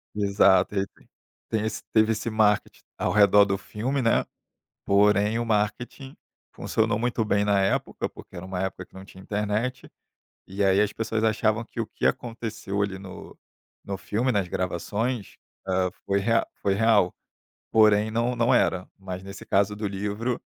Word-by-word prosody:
Exato, 100 -2 +3
e - - +2
aí 95 - -1
tem - - -26 0.4
tem 110 -1 0
esse 110 - -3
teve 110 0 +4
esse 110 +1 -2
marketing 110 -2 +1 0.2
ao - - 0
redor 105 0 +6
do 100 -1 -1
filme, 125 +8 -3
né, 115 - +3 0.6
porém 105 +2 +3
o 120 - -1
marketing 115 +5 -2 0.4
funcionou 110 -1 0
muito 120 0 0
bem 100 -1 +2
na 100 -1 +3
época, 95 0 -1
porque - - -15
era 85 - -7
uma 95 -1 -4
época 95 -2 -4
que - - -30
não 95 0 -10
tinha 95 -1 -14
internet, 105 +6 -2 0.6
e 100 +2 -2
aí 95 +1 +4
as 105 0 +1
pessoas 110 -1 -2
achavam 110 0 +1
que 115 - -7
o - - -5
que - - -2
aconteceu 115 -4 -3
ali 95 -1 -2
no 95 -1 -11 0.5
no 100 -1 -4
filme, 120 +6 -1
nas 100 -5 0
gravações, 100 +6 -3 0.3
hã, 95 -1 +1 0.2
foi 100 0 +2
rea 115 +3 +2 0.2
foi 100 - +2
real, 105 -4 +3 0.6
porém 110 -1 +4
não 115 +2 0
não 120 0 +2
era, 90 0 +1
mas 95 -1 -7
nesse 100 0 -9
caso 100 +1 +2
do 105 0 -3
livro, 105 +5 -3
105 Hz, 170 wpm, -25 LUFS, 100-115 Hz, 0.6 s, redor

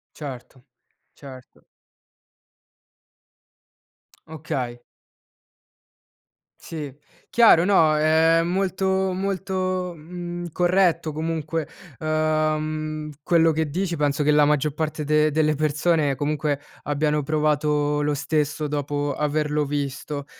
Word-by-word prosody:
Certo, 130 -3 -9 0.5
certo. 130 -3 -14 2.6
Okay. 140 -6 -4 1.8
Sì. 150 -4 -7 0.4
Chiaro 220 -8 +6
no, 160 -6 +4
è 160 +2 +4
molto 190 +1 0
molto, 185 -1 -2
mhmm, 175 +2 -7
corretto 175 -2 +2
comunque, 160 0 -3 0.3
uhm, 155 0 -1
quello 165 -1 +4
che 160 -1 -1
dici 180 +1 -1
penso 145 0 0
che 145 - +1
la 150 0 +5
maggior 150 0 +1
parte 155 -1 -2
de 150 +1 +2
delle 155 0 +2
persone 155 0 +1
comunque 145 +1 -1 0.2
abbiano 150 0 0
provato 150 0 +1
lo 150 0 +1
stesso 150 +1 -1
dopo 145 0 -2
averlo 150 0 0
visto. 145 0 -4
155 Hz, 95 wpm, -23 LUFS, 145-165 Hz, 2.6 s, Chiaro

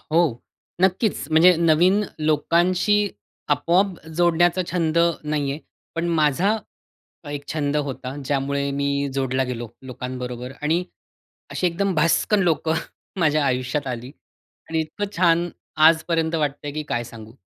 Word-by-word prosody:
हो, 160 +2 +1 0.6
नक्कीच. 190 +3 +1
म्हणजे 170 +3 +6
नवीन 170 +5 +4 0.2
लोकांशी 175 +7 +2 0.5
आपोआप 175 +6 +1 0.2
जोडण्याचा 175 +1 +3
छंद 170 -2 +1 0.3
नाही 150 -2 -1
आहे, 145 - -3 0.4
पण 165 +1 -1
माझा 165 +6 +2 0.7
एक 145 -1 -6
छंद 150 -1 -1
होता. 135 -2 -3
ज्यामुळे 140 +1 -1
मी 140 0 0
जोडला 130 -1 0
गेलो 120 -2 -5
लोकांबरोबर 125 -1 -6
आणि 165 +4 +1 0.7
अशी 180 - 0
एकदम 185 +2 0
भसकन 170 +6 +2
लोकं 160 -2 +1 0.5
माझ्या 155 -2 +3
आयुष्यात 130 +2 -1
आली 125 +1 -5 0.6
आणि 160 0 0
इतकं 195 +6 -5
छान 170 0 +3 0.4
आजपर्यंत 165 0 +1
वाटतंय 145 -2 -2
की 155 - -3
काय 120 0 -1
सांगू. 110 -1 -11
155 Hz, 125 wpm, -23 LUFS, 140-175 Hz, 0.7 s, म्हणजे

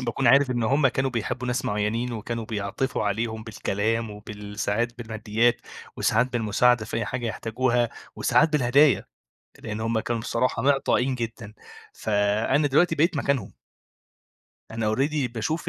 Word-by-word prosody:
باكون 125 +2 -1
عارف 135 +3 +5
إن 120 -2 0
هم 135 +4 +3
كانوا 135 +1 -1
بيحبوا 125 +1 -3
ناس 125 +2 -1
معينين، 110 +4 -1
وكانوا 115 +1 -4
بيعطفوا 110 +5 -2
عليهم 110 +2 -2
بالكلام 110 +1 -2
وبال 105 0 -9
ساعات 120 +4 -1
بالماديات 110 +1 0 0.4
وساعات 120 +4 +1
بالمساعدة 120 +1 +2
في 115 - -5
أي 115 - -1
حاجة 125 -2 -3
يحتاجوها 120 +2 0 0.3
وساعات 160 +1 +3
بالهدايا، 140 +1 +4 0.5
لأن 110 0 -5
هم 115 0 0
كانوا 115 +1 -2
بصراحة 120 +2 -1
معطائين 135 -1 +2
جدًا، 115 -3 -6 0.4
فأنا 105 +7 +1
دلوقتي 160 +4 +3
بقيت 160 +2 +2
مكانهم. 135 -7 -1 1.2
أنا 110 -1 -1
already 140 0 0
باشوف 155 +9 -2
115 Hz, 140 wpm, -25 LUFS, 110-130 Hz, 1.2 s, عارف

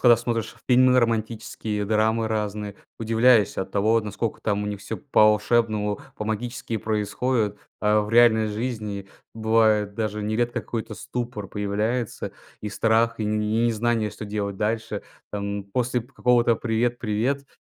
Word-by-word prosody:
когда 120 -2 +7
смотришь 115 -1 -3
фильмы 125 0 +6
романтические, 110 -2 -2
драмы 110 +1 +2
разные, 105 -1 -3 0.2
удивляюсь 115 -1 +4
от 95 - -3
того, 110 +3 +3
наскока 105 +1 -4
там 105 -1 0
у - - -3
них 105 -1 -4
всё - - -5
по-волшебному, 110 -3 +2 0.2
по-магически 110 +2 -3
происходит. 110 +1 -1 0.2
А 105 0 +3
в 105 - -6
реальной 115 -2 +5
жизни 105 -3 -4 0.3
бывает 110 -2 +2
даже 105 -1 -2
нередко 115 +3 0
какой-то 110 -2 -5
ступор 120 -4 -5
появляется, 105 +4 -2 0.3
и 105 - -4
страх, 115 +2 +2
и - - 0
не 105 +2 +1
незнание, 115 -1 0
что 105 - -8
делать 100 -1 -3
дальше. 110 0 -2 0.3
Там 100 -1 -3
после 125 +4 -1
п 125 +4 -22
какого-то 120 -2 +3
привет-привет 120 +3 -1
110 Hz, 135 wpm, -24 LUFS, 105-115 Hz, 0.3 s, когда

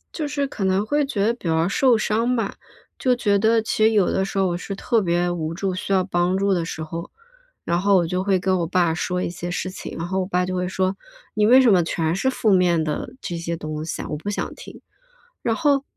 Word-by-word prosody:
就 310 - -2
是 285 -1 -1
可 215 - -5
能 190 +2 +1
会 290 +5 +1
觉 210 -8 -1
得 230 - +2
比 235 - -14
较 165 0 +2
受 245 +5 +3
伤 230 +3 +1
吧。 215 -4 -2 0.4
就 255 - +2
觉 210 -5 +2
得 225 +2 +3
其 215 0 -1
实 220 - +5
有 205 -4 +3
的 190 - +1
时 195 - -5
候 190 -1 +3
我 175 - -1
是 195 - -6
特 225 +3 +1
别 175 -1 +1
无 165 -2 -3
助、 190 +1 -2
需 185 - -5
要 190 -1 +4
帮 180 0 +1
助 200 0 +2
的 175 -2 0
时 160 -1 -6
候， 165 +2 -6 0.5
然 170 - +1
后 200 0 +4
我 170 -2 +1
就 180 +2 -1
会 195 -1 +2
跟 185 +1 +1
我 170 - 0
爸 170 -1 +1
说 180 +2 -2
一 - - -2
些 175 0 -6
事 185 - -3
情。 185 - -8
然 165 - -4
后 190 +1 -1
我 - - -2
爸 180 -1 0
就 185 0 -3
会 180 0 -1
说： 185 0 0 0.4
“你 210 -1 +3
为 255 +4 +7
什 255 - +5
么 180 -2 +4
全 165 0 -1
是 260 +8 +1
负 225 -4 +1
面 175 -3 +3
的 155 +9 -3
这 180 -4 -4
些 170 0 -3
东 155 -1 -5
西 160 - -4
啊？ - - -6
我 - - -2
不 160 +7 -5
想 205 - -3
听。” - - -11 0.6
然 230 - +1
后 280 +1 +2
190 Hz, 280 characters per minute, -22 LUFS, 175-215 Hz, 0.6 s, 为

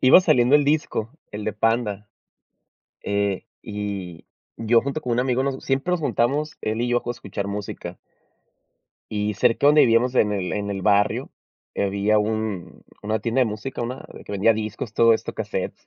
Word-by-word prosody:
iba 130 +7 +8
saliendo 140 -7 +4
el 145 -1 +5
disco, 145 -6 0 0.2
el 105 0 -6
de 110 - -1
Panda. 105 -1 0 0.9
Eh, 100 -2 -1 0.2
y 100 -5 -5 0.3
yo 115 +1 +3
junto 140 +4 -3
con 125 -4 -3
un 120 - +2
amigo 130 0 +1
nos 135 -1 -3
siempre 135 +6 0
nos 180 - 0
juntamos 145 +3 0
él 110 +1 -1
y 120 - 0
yo 120 0 +1
a 120 - -1
escuchar 100 -4 -5
música. 100 -3 -6 1.1
Y 105 0 -1
cerca 120 +5 +2
de - - +8
donde 150 +1 +6
vivíamos 120 +2 +3
en 105 -4 +3
el 95 -3 -2
en 100 -1 -2
el 95 -1 -4
barrio, 105 0 +2 0.4
había 100 +2 +1
un 105 -3 -3 0.2
una 110 +1 -1
tienda 115 +4 0
de 125 - +4
música, 110 +5 -5
una 120 +2 -4
de - - -11
que - - -9
vendía 100 +3 +4
discos, 110 +1 -4
todo 115 0 +5
esto, - - -4
casetes. - - -3
110 Hz, 180 wpm, -23 LUFS, 105-125 Hz, 1.1 s, iba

